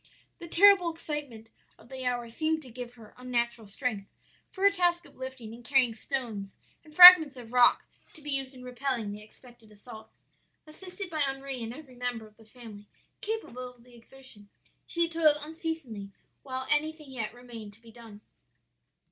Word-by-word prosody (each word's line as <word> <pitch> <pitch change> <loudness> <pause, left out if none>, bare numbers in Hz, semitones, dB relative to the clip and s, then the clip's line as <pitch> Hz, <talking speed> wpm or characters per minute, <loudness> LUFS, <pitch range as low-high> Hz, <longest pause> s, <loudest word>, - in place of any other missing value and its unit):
"'The 340 - -9
terrible 365 0 +5
excitement 290 -9 -7 0.3
of - - -19
the 260 0 -6
hour 245 -1 -2
seemed 315 +7 -1
to 260 -5 -13
give 245 +1 -9
her 220 -3 -16
unnatural 235 -3 -3
strength 200 -2 -4 0.4
for 380 - -7
her 400 - +6
task 350 -2 0
of - - -18
lifting 260 -4 -8
and 240 +1 -13
carrying 255 -2 +2
stones 220 -4 -5 0.3
and 305 -1 -18
fragments 355 -6 +11
of 240 -1 -11
rock 245 -1 +4 0.3
to - - -14
be 295 -1 -7
used 270 -1 -3
in 250 - -12
repelling 250 -3 -3
the 205 +1 -8
expected 225 +1 -18
assault. 220 +1 -13 0.6
Assisted 365 +4 -8
by 310 - -4
Henri 270 -2 -2
and 225 0 -5
every 275 0 -12
member 245 -2 -4
of 215 0 -19
the 225 - -19
family 215 -3 -13 0.3
capable 255 - -5
of 235 - -23
the 245 0 -20
exertion, 235 -3 -15 0.4
she 340 0 +1
toiled 325 -2 +3
unceasingly 300 -9 -6 0.3
while 260 -1 -5
anything 305 -1 -1
yet 225 -5 -4
remained 230 -3 -11
to 225 - -20
be 230 - -15
done. 220 -3 -14
250 Hz, 175 wpm, -28 LUFS, 230-305 Hz, 0.6 s, fragments